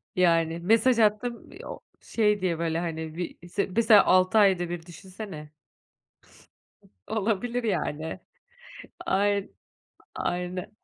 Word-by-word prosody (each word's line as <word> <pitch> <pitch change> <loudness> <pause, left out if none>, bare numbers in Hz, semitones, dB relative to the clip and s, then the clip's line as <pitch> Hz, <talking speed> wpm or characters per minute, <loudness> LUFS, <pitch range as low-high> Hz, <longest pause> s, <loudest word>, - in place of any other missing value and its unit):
Yani 165 -2 +2
mesaj 230 +6 +3
attım 220 +3 0
i - - -11
o - - -7 0.2
şey 210 -3 +1
diye 170 -3 -1
böyle 165 0 -1
hani 160 -2 -4
bir 175 0 -6
se 200 +2 -1
mesela 220 -3 +6
altı 185 +4 +4
ayda 190 -4 +4
bir 170 -1 -5
düşünsene. 180 -3 -10 1.6
Olabilir 225 +3 -1
yani. 160 -6 -2 0.9
Ayn 200 +1 +1 0.6
aynen, 180 +2 -3
185 Hz, 110 wpm, -26 LUFS, 170-210 Hz, 1.6 s, mesela